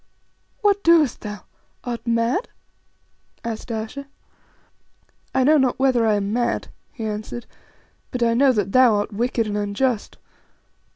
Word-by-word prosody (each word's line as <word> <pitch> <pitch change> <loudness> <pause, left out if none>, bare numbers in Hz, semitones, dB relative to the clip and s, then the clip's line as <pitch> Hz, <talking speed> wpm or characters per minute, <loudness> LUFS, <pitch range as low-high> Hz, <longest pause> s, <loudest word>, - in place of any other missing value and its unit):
"What 405 -1 +2
doest 330 -6 +4
thou? 210 -3 -6 0.4
Art 240 -1 -5
mad?" 235 - +1 0.9
asked 230 +1 -5
Ayesha. 225 +6 -5 1.3
"I 265 - +4
know 300 +3 +5
not 260 -2 +1
whether 255 -4 +3
I 215 - +3
am 200 0 -1
mad," 240 0 -1 0.2
he 225 - -6
answered, 215 +3 -5 0.6
"but 250 -2 -2
I 230 0 +3
know 265 +3 +5
that 205 -5 -1
thou 255 -2 +5
art 205 +1 -2
wicked 235 +1 0
and 210 -1 -3
unjust. 210 +3 -1
235 Hz, 135 wpm, -22 LUFS, 215-260 Hz, 1.3 s, know